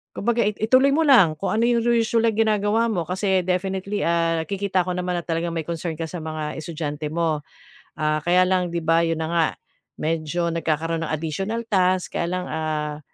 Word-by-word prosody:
kumbaga, 235 +1 +1
ituloy 230 +6 +3
mo 315 - +2
lang 200 - +6
kung 195 - -2
ano 225 +2 +2
'yong 240 -1 +2 0.2
usual 230 0 +2
na 220 - -2
ginagawa 215 0 +2
mo 180 -5 -1
kasi 190 0 +1
definitely, 190 +2 -1
ah, 165 -1 +1
nakikita 195 -1 0
ko 180 - -2
naman 180 0 -2
na 170 - -9
talagang 170 0 -2
may 165 - -2
concern 170 -1 -3
ka 165 - -3
sa 175 -3 -6
mga 155 -1 -4
estudyante 150 -2 -4
mo. 160 -2 0 0.6
Ah, 155 -1 +1
kaya 180 +1 +4
lang 185 -1 +1
'di 170 - -1
ba 165 +1 +4
'yon 165 -1 -1
na 160 - -2
nga 165 -1 +4 0.5
medyo 165 +2 -1
nagkakaroon 165 0 -1
ng - - -5
additional 190 +9 -2
task, 185 -2 +1
kaya 170 - 0
lang, 180 0 -2
ah, 155 -1 -3
175 Hz, 190 wpm, -23 LUFS, 160-200 Hz, 0.6 s, lang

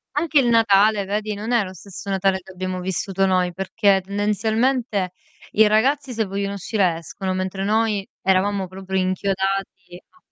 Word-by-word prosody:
Anche 305 0 +3
il 255 - +2
Natale 215 -3 +4
vedi, 210 +2 -2
non 215 +4 -5
è 235 -3 +3
lo 185 -1 -8
stesso 200 +1 -9
Natale 195 0 +1
che 190 - -14
abbiamo 185 0 -4
vissuto 190 +1 -1
noi, 185 -2 +1
perché 195 +1 +2
tendenzialmente 210 +1 0 0.4
i 215 0 +5
ragazzi 260 +5 +2
se 225 -1 0
vogliono 200 +1 -3
uscire 190 -3 0
escono, 185 +3 -5
mentre 185 +1 -3
noi 210 -1 +1 0.2
eravamo 190 +1 +1
proprio 190 +1 -4
inchiodati 190 -1 -2
a - - -28
195 Hz, 155 wpm, -22 LUFS, 190-215 Hz, 0.4 s, i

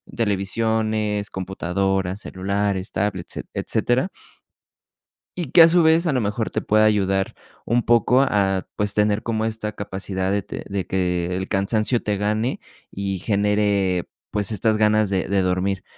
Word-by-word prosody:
televisiones, 110 0 0
computadoras, 95 0 -2
celulares, 100 0 -2
tablets, 95 -3 -3
et-etcétera. 130 +8 0 1.3
Y 165 -7 -4
que 170 - +8
a 165 - +10
su 170 0 +4
vez 160 +2 +4
a 155 - +1
lo 130 - +1
mejor 105 +2 -2
te - - -2
pueda 110 +1 +3
ayudar 95 -2 +1 0.3
un 120 +1 +1
poco 120 +3 +4
a 95 -7 +1
pues 105 0 -1
tener 105 0 +1
como 110 -1 -1
esta 110 -1 -3
capacidad 95 -1 -3
de 100 - +1
te - - -8
de 95 -3 -3
que 90 -1 -1
el 95 +1 -3
cansancio 110 +4 0
te 105 -1 -1
gane 105 +4 -1 0.3
y 95 -1 -3
genere, 100 -3 +1 0.2
pues 105 -1 -1
estas 110 +1 +1
ganas 110 -1 +3
de 95 -2 -1
de 100 -1 +1
dormir. 95 +1 -1
105 Hz, 150 wpm, -22 LUFS, 95-110 Hz, 1.3 s, a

